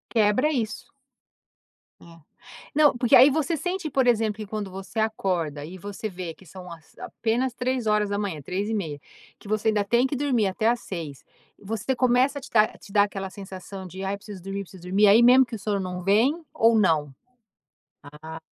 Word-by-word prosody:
Quebra 220 +7 +3
isso. 230 -7 -3 1.2
É. - - -15 0.7
Não, 295 -4 +4
porque 240 -1 +4
aí 260 +3 +9
você 315 +3 0
sente 355 +2 -3
por 265 -2 +1
exemplo 225 -3 +2
que 215 - -6
quando 210 -1 -5
você 195 +4 -6
acorda 180 -9 -1
e 175 +5 -9
você 205 +3 -6
vê 180 -3 -6
que 190 - -20
são 180 +2 -11
as 160 -2 -14
apenas 240 +3 -2
03:00, 210 - -1
03:30, 185 -2 -3 0.4
que - - -14
você 215 +1 0
ainda 210 -1 +1
tem 235 +5 +2
que 275 - -2
dormir 255 -7 +1
até 195 +4 -1
às 240 0 +1
06:00 160 -7 -7 0.3
você 220 +5 -3
começa 255 +3 +2
a - - -15
te - - -11
dar 215 -1 +3
te - - -15
dar 205 0 +5
aquela 195 -1 -4
sensação 190 0 -9
de: 190 +2 -8
"Ai 195 +1 -2
preciso 200 -2 -10
dormir, 195 +1 -4
preciso 185 -1 -15
dormir." 195 +4 +3
Aí 215 +4 +6
mesmo 255 +2 +7
que 235 -1 -7
o - - -8
sono 200 0 -1
não 180 -1 -5
vem 240 - +2
ou 225 0 +4
não? 155 -8 +2 1.1
Ah. 160 0 -7
210 Hz, 185 wpm, -25 LUFS, 190-240 Hz, 1.2 s, aí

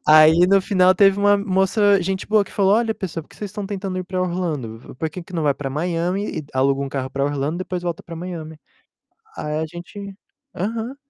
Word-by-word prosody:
Aí, 155 +3 +7
no 195 0 +5
final, 185 -1 +4
teve 195 0 +5
uma 205 0 +5
moça 200 +1 +3
gente 190 +1 -2
boa 210 -1 +3
que - - -15
falou: 195 -1 +3
"Olha, 225 0 +1
pessoal, 170 -3 -5
por - - -25
que - - -17
vocês 205 -2 -6
estão 200 +1 -5
tentando 195 -2 -4
ir 185 - -4
pra 185 0 -3
Orlando? 165 -11 -2
V 125 - -13
Por 160 - -2
que 180 +3 -7
que 170 - -16
não 165 -3 -1
vai 145 -2 +2
pra 135 -1 -5
Miami 175 +6 -1
e - - -4
d 145 - -18
aluga 135 +1 +2
um 140 - -3
carro 135 -1 -3
pra 140 0 -1
Orlando, 145 +3 -1
depois 185 -1 -4
volta 175 -2 -3
pra 170 - -9
Miami?" 165 -2 -6 0.8
Aí 150 0 -2
a 160 - -1
gente: 190 +4 -9 0.4
"Aham", 225 +7 -3
180 Hz, 235 wpm, -21 LUFS, 155-195 Hz, 0.8 s, Aí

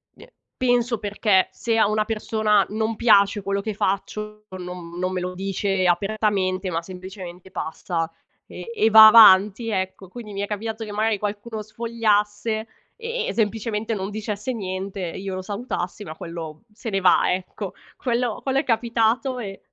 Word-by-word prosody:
mi - - -15
è - - -18 0.2
penso 245 -2 +1
perché 205 -2 +2
se 230 -1 -1
a 220 - +4
una 215 0 +1
persona 215 -2 +1
non 220 +1 -1
piace 205 -3 +4
quello 200 +1 -1
che 215 +1 -3
faccio, 210 +2 -3
non 180 -1 -8
non 185 0 -1
me 185 - -2
lo 180 0 -3
dice 195 0 -1
apertamente, 195 0 0
ma 165 -1 -1
semplicemente 185 0 -10
passa 165 0 -3 0.4
e 465 - -9
e 225 - +3
va 220 0 +11
avanti, 215 0 +7
ecco. 190 -1 -3
Quindi 215 +2 -9
mi 200 - -3
è 205 - -2
capitato 220 +2 -4
che 210 - -8
magari 215 +1 +1
qualcuno 210 +2 -4
sfogliasse 220 -1 -1 0.3
e 465 +1 -3
e - - -2
semplicemente 220 0 -1
non 195 -2 -3
dicesse 215 +3 -4
niente 190 -3 -4
e - - -8
io 195 0 -5
lo 185 - -4
salutassi, 200 -1 -4
ma 155 -4 -8
quello 165 -2 -7
se 225 +2 -7
ne 195 - +1
va, 180 -1 +4
ecco. 185 0 -5 0.2
Quello 240 -3 -1
quello 270 0 +1
è - - -1
capitato 235 +1 +1
e 195 -4 -6
210 Hz, 170 wpm, -23 LUFS, 190-225 Hz, 0.4 s, va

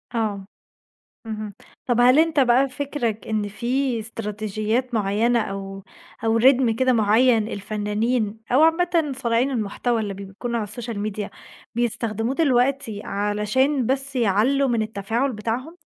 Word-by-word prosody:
آه. 210 -4 -1 0.8
اهم، 215 -2 -5 0.3
طب 245 -1 +1
هل 250 +4 +6
أنت 320 -2 +3
بقى 260 +1 +4
فكرك 255 -5 -3
إن 215 -2 -1
في 245 +4 -1
استراتيجيات 215 +2 -3
معينة، 225 +3 +2
أو 195 -1 -6 0.4
أو 225 0 +2
رتم 250 -1 +4
كده 260 +2 +2
معين، 225 +1 +3
الفنانين 215 +2 -2
أو 260 +4 +5
عامَّةً 325 -2 +2
صانعين 240 +2 +1
المحتوى، 230 0 -1
اللي 205 -2 -3
بيكونوا 200 +5 -5
على - - -2
السوشيال 220 +1 -5
ميديا، 210 0 -3 0.5
بيستخدموه 230 0 -1
دلوقتي 260 -7 +1
علشان 210 +7 0
بس 270 +2 -1
يعلُّوا 245 +5 +2
من 235 -3 +1
التفاعل 225 +5 -1
بتاعهم؟ 235 +10 -4
230 Hz, 130 wpm, -23 LUFS, 210-255 Hz, 0.8 s, هل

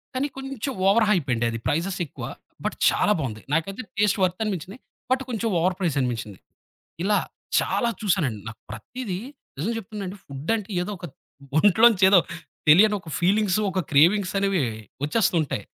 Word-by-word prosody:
కానీ 265 +3 0
కొంచెం 270 -1 -4
ఓవర్‌హైపండి, 180 - +3
అది 115 - -4
ప్రైజెస్ 180 +5 -1
ఎక్కువ. - - -10 0.4
బట్ - - -1
చాలా 210 - +2
బావుంది. 110 -6 -4
నాకైతే 195 +8 -1 0.2
టేస్ట్ 210 -1 +3
వర్త్ 185 +3 0
అనిపించినియి. 195 +2 -4 0.3
బట్ 260 +1 +3
కొంచెం 230 -1 -1
ఓవర్ 180 +2 +1
ప్రైస్ 170 -7 0
అనిపించింది. 115 -6 -3 0.6
ఇలా 205 +2 +3 0.4
చాలా 235 - 0
చూసానండి. 170 - 0
నాకు 115 - -10
ప్రతీదీ 185 - -5 0.4
నిజం 190 +10 -1
చెప్తునానండి 205 -3 -6
ఫుడంటే 190 +10 -3
ఏదో 200 - -4
ఒక - - -11 0.5
ఒంట్లోంచేదో 200 -1 +6 0.5
తెలియని 210 +7 +7
ఒక 170 - -14
ఫీలింగ్సు 200 +2 +2
ఒక 185 - -2
క్రేవింగ్సనేవి 190 +2 +3 0.4
వచ్చేస్తూ 185 +5 +1
ఉంటాయి. 120 -8 -4
190 Hz, 135 wpm, -24 LUFS, 155-210 Hz, 0.6 s, తెలియని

